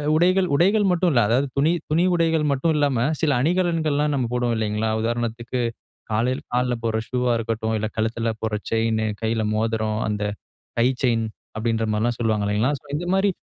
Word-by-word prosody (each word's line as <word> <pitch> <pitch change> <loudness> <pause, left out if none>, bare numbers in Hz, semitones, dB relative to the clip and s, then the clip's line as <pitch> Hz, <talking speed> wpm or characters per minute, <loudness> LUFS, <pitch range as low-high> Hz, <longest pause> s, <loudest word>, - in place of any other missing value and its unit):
உடைகள் 185 +3 +3
உடைகள் 200 +6 +3
மட்டும் 180 0 +2
இல்லை 120 -4 +4
அதாவது 135 +4 +2
துணி 150 +4 +3 0.2
துணி 160 +3 +3
உடைகள் 165 -2 +2
மட்டும் 140 +4 +1
இல்லாம 135 -5 +2 0.2
சில 155 -3 +2
அணிகலன்கள்லாம் 160 -3 +1
நம்ம 130 -3 0
போடுவோம் 120 -1 0
இல்லிங்களா, 110 0 -1
உதாரணத்துக்கு 120 +1 -2 0.5
காலையில 125 +5 0
கால்ல 125 0 +1
போடுற 110 -1 0
ஷூஆ 125 -1 +1
இருக்கட்டும். 110 0 -2
இல்ல, 110 - -2
கழுத்துல 115 +1 0
போடுற 110 -1 -1
செயின் 110 0 +1 0.2
கையில 110 0 0
மோதிரம், 110 0 0
அந்த 105 0 -2 0.6
கை 120 - +4 0.2
செயின் 115 -2 +2 0.3
அப்படிங்கிற 115 0 0
மாரிலாம் 115 +2 0
சொல்வாங்க 110 -3 +1
இல்லிங்களா. 110 +7 +1
சோ, - - -22
இந்த 175 +3 -4
மாரி 195 +1 +3
120 Hz, 165 wpm, -23 LUFS, 110-150 Hz, 0.6 s, இல்லை